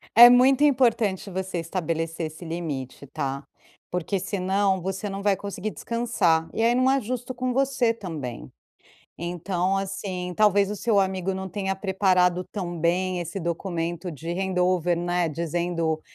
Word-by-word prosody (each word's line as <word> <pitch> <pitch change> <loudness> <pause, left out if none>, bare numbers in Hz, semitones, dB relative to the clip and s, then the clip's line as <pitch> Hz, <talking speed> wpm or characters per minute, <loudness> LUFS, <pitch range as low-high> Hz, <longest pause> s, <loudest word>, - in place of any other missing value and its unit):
É 240 +1 +11
muito 260 +3 +5
importante 230 -8 +2
você 190 0 -3
estabelecer 165 -1 -2
esse 160 +3 -11
limite, 145 -5 -5
tá? 135 +1 -4 0.5
Porque, 180 +2 -1
se 195 +2 -3
não, 190 +1 +1
você 190 +3 -3
não 195 0 -5
vai 200 -1 +3
conseguir 200 +2 -5
descansar, 225 -9 0
e - - -1
aí, 235 +1 +4
não 255 +1 +3
é 270 0 +2
justo 250 +2 -4
com 250 0 -2
você 255 -3 +1
também. 155 - -6 0.7
Então, 180 +2 -1
assim, 185 -2 -4
talvez 205 0 +4
o - - -3
seu 210 0 +2
amigo 190 -1 0
não 190 0 -4
tenha 195 0 -2
preparado 185 -2 +2
tão 180 -4 -4
bem 180 +2 +1
esse 175 +3 -4
documento 170 0 -3
de 165 +3 -6
hand 190 0 -2
over, 180 -1 +2
né, 175 0 0
dizendo: 165 0 -1
185 Hz, 155 wpm, -25 LUFS, 170-205 Hz, 0.7 s, É